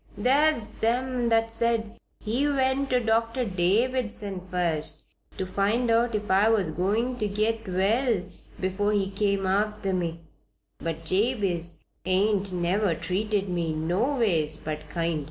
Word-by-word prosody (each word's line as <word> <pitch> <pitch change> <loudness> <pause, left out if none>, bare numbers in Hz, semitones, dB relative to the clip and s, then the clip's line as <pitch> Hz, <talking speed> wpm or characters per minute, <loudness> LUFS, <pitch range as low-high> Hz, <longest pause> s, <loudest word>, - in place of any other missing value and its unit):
There's 270 +1 +2
them 245 +1 0
that 225 0 +2
said 230 -1 -1 0.2
he 240 +7 0
went 270 -1 +1
to 250 - +3
Doctor 230 +2 +1
Davison 205 +1 0
first 160 -4 0 0.3
to 190 - -2
find 210 +6 +1
out 230 0 +2
if 210 -1 -2
I 200 +3 +5
was 200 -8 +2
goin' 220 +9 0
to 210 - 0
git 215 +2 -1
well 200 +3 +1 0.4
before 195 +3 0
he 195 -1 0
come 200 -1 0
arter 200 0 0
me; 170 -2 -2 0.6
but 165 0 -4
Jabez 185 -4 0 0.2
ain't 195 +2 +1
never 180 +1 +1
treated 200 +3 -1
me 170 -3 -1
noways 175 - +1
but 155 0 -6
kind. 165 0 -1
205 Hz, 135 wpm, -26 LUFS, 180-230 Hz, 0.6 s, I